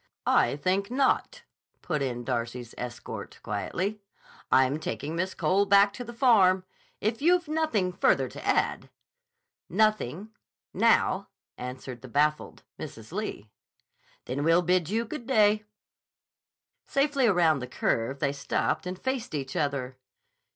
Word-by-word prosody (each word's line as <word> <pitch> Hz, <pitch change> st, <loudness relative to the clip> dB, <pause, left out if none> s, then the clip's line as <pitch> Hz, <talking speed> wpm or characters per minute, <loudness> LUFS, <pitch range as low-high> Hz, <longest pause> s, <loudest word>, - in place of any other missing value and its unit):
"I -, -, +3 dB
think 185 Hz, +7 st, 0 dB
not," 280 Hz, -, +1 dB, 0.4 s
put 155 Hz, -4 st, -1 dB
in 120 Hz, -3 st, -2 dB
Darcy's 120 Hz, -1 st, -3 dB
escort 120 Hz, -1 st, -7 dB
quietly. 185 Hz, -, -3 dB, 0.5 s
"I'm 130 Hz, +3 st, +4 dB
taking 155 Hz, 0 st, -4 dB
Miss 185 Hz, +2 st, -2 dB
Cole 200 Hz, +2 st, +2 dB
back 200 Hz, 0 st, +5 dB
to 245 Hz, -, -6 dB
the 235 Hz, -, -8 dB
Farm. 205 Hz, -7 st, +4 dB, 0.4 s
If 220 Hz, +4 st, -1 dB
you've 350 Hz, +1 st, +3 dB
nothing 300 Hz, -, 0 dB
further 175 Hz, -, +2 dB
to -, -, -10 dB
add—" -, -, 0 dB, 0.8 s
"Nothing—now," 215 Hz, -, 0 dB, 0.3 s
answered 125 Hz, -1 st, -7 dB
the 130 Hz, -, -10 dB
baffled 150 Hz, +4 st, 0 dB, 0.2 s
Mrs. 110 Hz, +3 st, -9 dB
Lee. 175 Hz, -, -5 dB, 0.7 s
"Then 135 Hz, +3 st, -3 dB
we'll 165 Hz, +3 st, +4 dB
bid 180 Hz, -2 st, +1 dB
you 225 Hz, +3 st, 0 dB
good 240 Hz, 0 st, -7 dB
day." 215 Hz, -4 st, +3 dB, 1.2 s
Safely 275 Hz, -2 st, +2 dB
around 170 Hz, -7 st, +3 dB
the 125 Hz, -, -5 dB
curve 125 Hz, +1 st, -1 dB
they 140 Hz, 0 st, 0 dB
stopped 145 Hz, +6 st, -1 dB
and 180 Hz, 0 st, -4 dB
faced 260 Hz, -5 st, -3 dB
each 135 Hz, -2 st, -4 dB
other. 140 Hz, -5 st, -2 dB
180 Hz, 130 wpm, -28 LUFS, 135-215 Hz, 1.2 s, back